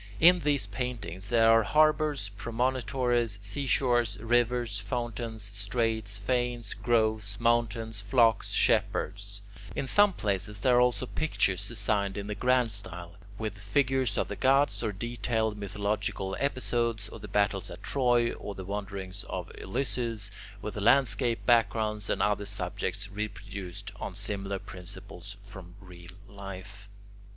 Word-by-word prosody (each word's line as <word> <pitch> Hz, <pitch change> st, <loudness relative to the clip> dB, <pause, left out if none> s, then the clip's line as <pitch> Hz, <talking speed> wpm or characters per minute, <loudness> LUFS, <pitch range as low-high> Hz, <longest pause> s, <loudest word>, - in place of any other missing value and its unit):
In 175 Hz, +2 st, +7 dB
these 145 Hz, -6 st, +2 dB
paintings 100 Hz, -4 st, -5 dB
there 115 Hz, -1 st, +5 dB
are 115 Hz, 0 st, +6 dB
harbours, 150 Hz, -3 st, +3 dB
promontories, 120 Hz, 0 st, 0 dB
seashores, 120 Hz, +1 st, +1 dB
rivers, 120 Hz, -1 st, +1 dB
fountains, 115 Hz, -2 st, -4 dB
straits, 105 Hz, 0 st, 0 dB
fanes, 120 Hz, +1 st, 0 dB
groves, 110 Hz, -2 st, +1 dB
mountains, 115 Hz, -2 st, +1 dB
flocks, 115 Hz, +2 st, +3 dB
shepherds; 100 Hz, 0 st, +1 dB, 0.3 s
in -, -, -1 dB
some 205 Hz, +9 st, +6 dB
places 100 Hz, -, -2 dB
there 125 Hz, +1 st, +4 dB
are -, -, +6 dB
also 125 Hz, +1 st, +2 dB
pictures 100 Hz, -, 0 dB
designed 100 Hz, -3 st, -1 dB
in 100 Hz, -, -3 dB
the 105 Hz, -, -3 dB
grand 125 Hz, +2 st, +2 dB
style, 90 Hz, -4 st, -4 dB, 0.3 s
with 105 Hz, -2 st, -4 dB
figures 130 Hz, +2 st, +1 dB
of -, -, +1 dB
the 100 Hz, -, -4 dB
gods 135 Hz, +4 st, +3 dB
or 110 Hz, -, 0 dB
detailed 110 Hz, +1 st, -1 dB
mythological 100 Hz, -1 st, -2 dB
episodes, 120 Hz, -5 st, 0 dB
or 115 Hz, -, -9 dB
the 105 Hz, -, -8 dB
battles 100 Hz, -2 st, +1 dB
at 90 Hz, +3 st, -10 dB
Troy, 120 Hz, -3 st, +2 dB
or 100 Hz, -, -7 dB
the 95 Hz, -, -7 dB
wanderings 100 Hz, -1 st, -5 dB
of -, -, -4 dB
Ulysses, 115 Hz, -2 st, -3 dB, 0.3 s
with 105 Hz, -, -4 dB
landscape 115 Hz, 0 st, +3 dB
backgrounds, 110 Hz, -3 st, +2 dB
and -, -, +1 dB
other 105 Hz, -1 st, +1 dB
subjects 100 Hz, 0 st, -3 dB
reproduced 100 Hz, -3 st, -6 dB
on -, -, -5 dB
similar 100 Hz, -1 st, -2 dB
principles 95 Hz, +1 st, -9 dB
from 95 Hz, -3 st, -11 dB
real 90 Hz, -3 st, -12 dB, 0.2 s
life. 100 Hz, 0 st, -9 dB
105 Hz, 130 wpm, -29 LUFS, 100-120 Hz, 0.3 s, In